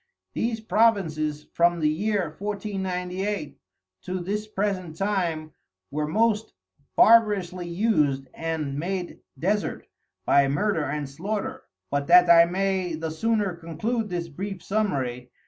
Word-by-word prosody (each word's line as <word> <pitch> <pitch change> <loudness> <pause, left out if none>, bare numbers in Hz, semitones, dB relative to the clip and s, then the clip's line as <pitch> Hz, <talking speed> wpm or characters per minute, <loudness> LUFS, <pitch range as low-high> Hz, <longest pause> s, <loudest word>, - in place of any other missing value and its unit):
These 230 -1 -1
Provinces 165 -10 +1
from 170 0 +3
the 155 - +2
Year 180 0 -1
1498 190 -4 -3 0.4
to 185 0 -4
this 205 +4 -3
present 195 -5 -2
time 175 -6 -1 0.4
were 150 +1 -1
most 220 +4 +1 0.4
barbarously 200 -6 +4
us'd, 150 -9 +1
and 155 -4 -3
made 180 +1 -3 0.2
desert 205 +8 -1 0.4
by 140 -1 +5
Murder 165 +3 0
and 145 0 -3
Slaughter, 215 - -4 0.3
but 140 0 -1
that 175 0 +7
I 170 0 +8
may 185 -1 -1
the 160 0 -4
sooner 210 +3 0
conclude 210 +8 -3
this 175 -2 -3
brief 190 +4 -6
summary. 135 - -1
180 Hz, 120 wpm, -25 LUFS, 155-210 Hz, 0.4 s, I